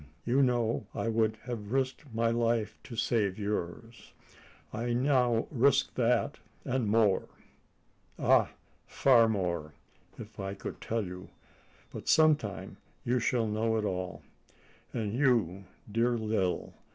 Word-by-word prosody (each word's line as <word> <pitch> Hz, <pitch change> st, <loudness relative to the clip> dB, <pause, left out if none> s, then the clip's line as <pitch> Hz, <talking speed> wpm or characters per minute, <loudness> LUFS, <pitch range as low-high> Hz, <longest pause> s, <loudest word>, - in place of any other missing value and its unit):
You 130 Hz, +4 st, +3 dB
know 120 Hz, -4 st, +1 dB
I 115 Hz, -, -1 dB
would 110 Hz, -1 st, +1 dB
have 115 Hz, -4 st, -6 dB
risked 130 Hz, +3 st, -1 dB
my 115 Hz, +1 st, +1 dB
life 115 Hz, -2 st, 0 dB
to 120 Hz, -, -8 dB
save 105 Hz, -4 st, 0 dB
yours. 105 Hz, +2 st, -5 dB, 0.6 s
I 120 Hz, +2 st, -2 dB
now 125 Hz, -2 st, +2 dB
risk 140 Hz, 0 st, +3 dB
that 125 Hz, +3 st, +1 dB, 0.3 s
and 130 Hz, -4 st, 0 dB
more 105 Hz, -2 st, +3 dB, 0.9 s
ah! -, -, +4 dB, 0.4 s
far 120 Hz, -4 st, +4 dB
more, 85 Hz, -7 st, -2 dB, 0.4 s
if 110 Hz, 0 st, -11 dB
I 95 Hz, 0 st, -4 dB
could -, -, -7 dB
tell 115 Hz, -2 st, -2 dB
you; 90 Hz, 0 st, -8 dB, 0.6 s
but -, -, -8 dB
some 155 Hz, -1 st, +6 dB
time 105 Hz, -8 st, -7 dB, 0.3 s
you 125 Hz, +1 st, +2 dB
shall 120 Hz, 0 st, +1 dB
know 110 Hz, +1 st, 0 dB
all. 90 Hz, -5 st, -4 dB, 0.7 s
And 110 Hz, -3 st, -3 dB
you, 115 Hz, -, +1 dB, 0.3 s
dear 120 Hz, +2 st, +2 dB
Lil! 105 Hz, -5 st, -1 dB
115 Hz, 125 wpm, -30 LUFS, 105-120 Hz, 0.9 s, some